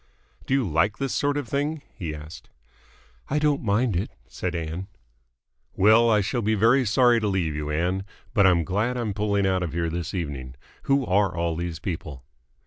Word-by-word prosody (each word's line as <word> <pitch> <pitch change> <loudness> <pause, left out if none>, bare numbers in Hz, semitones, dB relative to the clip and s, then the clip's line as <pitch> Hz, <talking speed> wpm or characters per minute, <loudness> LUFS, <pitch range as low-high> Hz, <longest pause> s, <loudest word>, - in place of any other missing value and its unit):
"Do 135 - +2
you 130 -6 +1
like 85 +6 +1
this 135 -2 -2
sort 145 0 +1
of 145 -4 -3
thing?" 145 +4 -2
he 80 -4 -5
asked. 75 +1 -11 0.8
"I 150 - 0
don't 150 -1 +2
mind 110 0 +1
it," 90 +4 -1 0.2
said 90 -1 -4
Ann. 85 +3 -4 0.9
"Well, 110 +4 +5
I 105 -2 +4
shall 120 +5 -1
be 110 0 +1
very 115 +5 +4
sorry 120 +2 +4
to 105 - 0
leave 90 -6 0
you, 75 0 -4
Ann, 90 +5 0 0.3
but 100 -5 +5
I'm 85 -2 +4
glad 105 +8 -1
I'm 115 -4 -2
pulling 100 -1 0
out 95 -1 +1
of 85 -3 -3
here 85 -1 -1
this 85 +2 -4
evening. 70 -7 -4 0.3
Who 140 -1 +2
are 95 -2 +1
all 85 -1 0
these 85 -1 -4
people?" 80 -6 -6
95 Hz, 190 wpm, -25 LUFS, 85-115 Hz, 0.9 s, Well